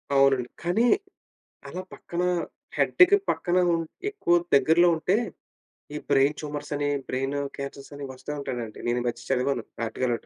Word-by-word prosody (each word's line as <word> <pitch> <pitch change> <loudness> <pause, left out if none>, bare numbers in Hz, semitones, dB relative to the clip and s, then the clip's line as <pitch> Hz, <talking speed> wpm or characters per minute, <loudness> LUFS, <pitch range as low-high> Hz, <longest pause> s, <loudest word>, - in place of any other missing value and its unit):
అవునండి. 135 -3 +4
కానీ 210 +8 +2 0.8
అలా 185 - -5
పక్కన 175 +1 -4 0.5
హెడ్డుకి 375 +3 +6
పక్కన 180 0 +1 0.2
ఉన్ 165 0 0 0.3
ఎక్కువ 175 - +2 0.2
దగ్గరలో 170 +5 +5
ఉంటే 180 +5 +1 0.8
ఈ - - -2
బ్రెయిన్ 140 +2 +4
ట్యూమర్సని, 145 -1 -3 0.2
బ్రెయిను 135 +2 -1 0.2
క్యాన్సర్సని 140 0 -7
వస్తా 130 +3 -7
ఉంటాయండి 120 -5 -5
నేనీ 120 +1 +1
మధ్య - - -4
చదివాను 130 -1 +1 0.2
ఆర్టికలోకటి. 120 0 -2
145 Hz, 125 wpm, -26 LUFS, 130-170 Hz, 0.8 s, హెడ్డుకి